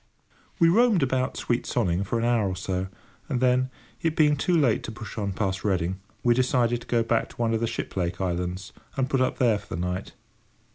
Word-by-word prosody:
We 170 - +5
roamed 210 - +4
about 130 -1 0
sweet 120 0 -1
Sonning 95 -5 +1
for 100 +4 -2
an 115 - 0
hour 115 -5 +2
or 95 - -3
so, 90 0 -2 0.4
and 130 -4 0
then, 130 0 +3 0.3
it 165 -1 0
being 150 -2 +4
too 170 +5 +1
late 130 -8 +3
to - - -5
push 110 -3 -8
on 100 -3 -2
past 95 -1 -2
Reading, 95 -2 0 0.2
we 120 - +5
decided 120 -1 +2
to - - -13
go 115 -1 +2
back 115 0 0
to - - -15
one 115 -1 0
of 110 - +1
the 115 - 0
Shiplake 90 -6 -3
islands, 90 0 -3 0.2
and 130 -1 +1
put 135 -1 +1
up 130 - +1
there 115 -5 +3
for 105 -4 -7
the - - -4
night. 90 +2 -3
115 Hz, 220 wpm, -26 LUFS, 95-130 Hz, 0.4 s, We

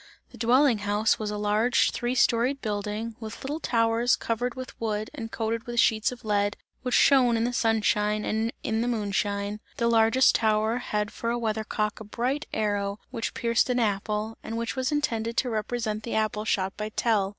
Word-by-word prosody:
The - - -13
dwelling 250 0 +4
house 205 +1 +1
was 215 -1 -2
a 210 - -3
large 210 +4 +2
three 245 +1 -2
storied 250 +3 +2
building, 210 +1 -3
with 220 -2 -8
little 290 +4 -3
towers 230 -2 +2
covered 235 +1 -2
with 255 -1 -7
wood 215 -1 -2
and 225 -1 -6
coated 225 +2 -2
with 240 0 -1
sheets 220 +1 +3
of 245 -2 -10
lead, 205 -1 +1 0.2
which 250 -2 0
shone 250 -4 +5
in 225 - +1
the 245 +1 -1
sunshine 215 -2 +1
and 220 +2 0
in 220 0 0
the 240 - 0
moonshine; 205 -2 -1 0.2
the 235 - +1
largest 230 +3 +5
tower 220 +1 +2
had 210 -4 -2
for 230 - -3
a 240 - 0
weather 220 -2 -1
cock 215 -1 -2
a - - -7
bright 250 +7 -2
arrow 205 -2 -1
which 230 - -4
pierced 235 -1 +1
an 250 - +1
apple 210 0 -1
and 225 - -5
which 230 0 -3
was 260 +1 -1
intended 235 -6 -1
to 250 - +1
represent 215 0 -2
the 230 - -4
apple 215 -1 0
shot 190 -2 0
by 210 +1 -4
Tell. 215 -3 +1
225 Hz, 195 wpm, -27 LUFS, 210-240 Hz, 0.2 s, shone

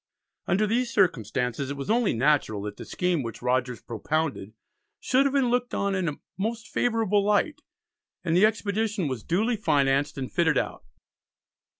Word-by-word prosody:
Under 195 +4 +2
these 235 +3 0
circumstances 125 - 0
it 140 - -4
was 140 +9 -3
only 235 -2 +3
natural 115 -5 +1
that 105 0 -5
the - - -8
scheme 180 -4 0
which 115 -1 -7
Rogers 125 -1 0
propounded 125 -3 -2 0.4
should 270 +2 +3
have 275 - -3
been 265 -4 +2
looked 245 0 0
on 200 0 0
in 185 -3 0
a 145 - -7 0.2
most 225 +2 -2
favourable 220 -4 +1
light, 210 +9 +1 0.6
and 165 -2 0
the 185 - +5
expedition 215 -3 -1
was 130 -4 -3
duly 220 - 0
financed 140 -6 +1
and 130 -2 -5
fitted 160 -5 +2
out. - - -2
175 Hz, 165 wpm, -26 LUFS, 135-220 Hz, 0.6 s, the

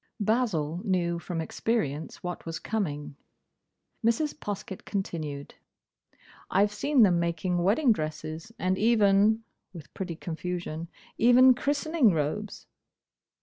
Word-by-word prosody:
Basil 200 -8 0
knew 175 -3 0
from 170 -1 -4
experience 160 -4 -2
what 180 0 -5
was 165 -1 -5
coming. 150 -11 -3 0.9
Mrs. 235 +7 +1
Poskett 205 -6 -6
continued, 155 -8 -4 1.0
"I've 205 +2 +2
seen 275 +3 +3
them 180 -4 +4
making 170 +1 -1
wedding 220 - +3
dresses, 155 +1 -4
and 185 -1 0
even," 215 0 +4 0.3
with 160 -5 -11
pretty 180 -3 -4
confusion, 170 -1 -5 0.3
"even 255 +2 +7
christening 285 - +2
robes." 165 +7 -3
185 Hz, 105 wpm, -28 LUFS, 165-220 Hz, 1.0 s, even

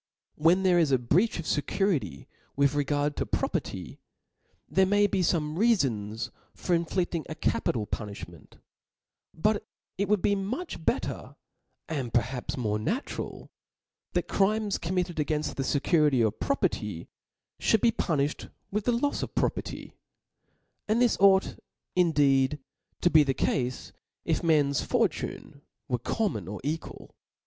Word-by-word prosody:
When 170 +5 +3
there 180 -2 +4
is 155 -4 +2
a 130 - +5
breach 160 - +2
of 165 - -5
fecurity 150 - -1 0.3
with 140 0 +3
regard 145 0 0
to - - -1
property, - - -3 0.7
there 190 0 +3
may 205 +1 +4
be 200 - 0
fome 155 -3 0
reafons 120 - +1 0.2
for 175 - 0
infli£fcing 170 0 -1
a 155 - -4
capital 110 -7 0
puni(h 105 -1 -5
ment: 85 -4 -17 0.7
but 210 +5 0 0.4
it 200 0 0
would 210 -3 +2
be 205 - +3
much 200 - -4
better, - - -2 0.5
and 135 -7 -3
perhaps 120 +3 -1
more 105 -4 -1
natural, 230 - -4 0.6
that - - 0
crimes 210 +1 +1
committed 180 0 -2
againft 150 0 -1
the - - -3
fecurity 145 -3 +3
of 110 - -2
property 280 - -1 0.5
(hould 220 - +3
be' 235 - +5
puni(bed 150 -8 -1 0.2
with 210 +1 -1
the 245 - +3
lofs 285 +4 0
of - - -5
property; - - -2 0.9
and 215 +2 +2
this 245 -2 +4
ought 195 -1 +4 0.4
indeed 145 -5 +3 0.4
to 175 - +3
be 155 - +7
the 135 -3 +1
cafe 125 -2 +1 0.5
if - - 0
men's 145 -4 +3
fortunes - - -1 0.3
were 125 -2 -1
common 120 - -2
or 105 +2 -5
equal. 155 +3 -5
160 Hz, 140 wpm, -28 LUFS, 135-195 Hz, 0.9 s, be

